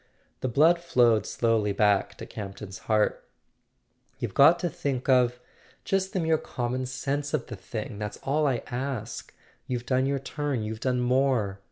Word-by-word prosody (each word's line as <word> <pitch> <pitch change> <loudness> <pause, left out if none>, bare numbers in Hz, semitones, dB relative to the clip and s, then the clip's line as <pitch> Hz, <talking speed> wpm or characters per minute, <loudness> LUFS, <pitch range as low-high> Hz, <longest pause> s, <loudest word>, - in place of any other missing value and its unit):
The 130 - -2
blood 160 +8 +4
flowed 120 - +3
slowly 110 -3 +1
back 100 -1 +2
to - - -7
Campton's 100 -1 -8
heart. 110 -1 +2 0.9
"You've - - -4
got 160 +5 +7
to 175 - +1
think 140 -5 -3
of—just 130 +9 0
the 190 - 0
mere 160 -2 +2
common 125 +1 -3
sense 140 +3 -2
of 135 - -3
the 120 - -7
thing. 105 +2 -6
That's 105 -1 -4
all 150 +2 +1
I 125 -4 0
ask. 125 -2 -4 0.4
You've 125 -1 -3
done 130 +1 +1
your 140 0 +1
turn; 135 -2 -3
you've 110 +1 -4
done 125 0 0
more. 125 -6 +1
125 Hz, 160 wpm, -27 LUFS, 110-140 Hz, 0.9 s, got